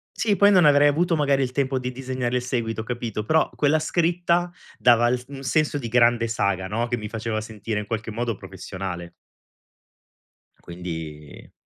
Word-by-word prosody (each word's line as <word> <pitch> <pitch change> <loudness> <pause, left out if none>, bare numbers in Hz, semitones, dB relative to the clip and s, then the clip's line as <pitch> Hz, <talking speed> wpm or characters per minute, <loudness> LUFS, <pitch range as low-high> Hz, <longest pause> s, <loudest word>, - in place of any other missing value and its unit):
Sì, 210 -3 +1
poi 200 +2 +5
non 180 -4 +5
avrei 145 0 +6
avuto 165 +4 +1
magari 140 -3 +2
il 130 -2 -1
tempo 135 -1 0
di 125 0 -4
disegnare 130 -1 -3
il 125 - +1
seguito, 115 -3 -2
capito? 115 -3 -4
Però, 155 +7 +2
quella 150 +2 +2
scritta 175 +1 +1 0.3
dava 120 -1 +5
il 125 - +2
s 125 - -13
un 140 -1 -8
senso 150 +2 +1
di 120 -5 -4
grande 120 0 +3
saga, 100 -5 -1
no, 115 +4 -1
che 120 0 -1
mi 105 0 -5
faceva 110 0 -3
sentire 110 0 -4
in 105 - -5
qualche 110 0 -4
modo 115 0 -2
professionale. 95 -2 -7 1.6
Quindi 80 -4 -8
120 Hz, 175 wpm, -24 LUFS, 110-145 Hz, 1.6 s, avrei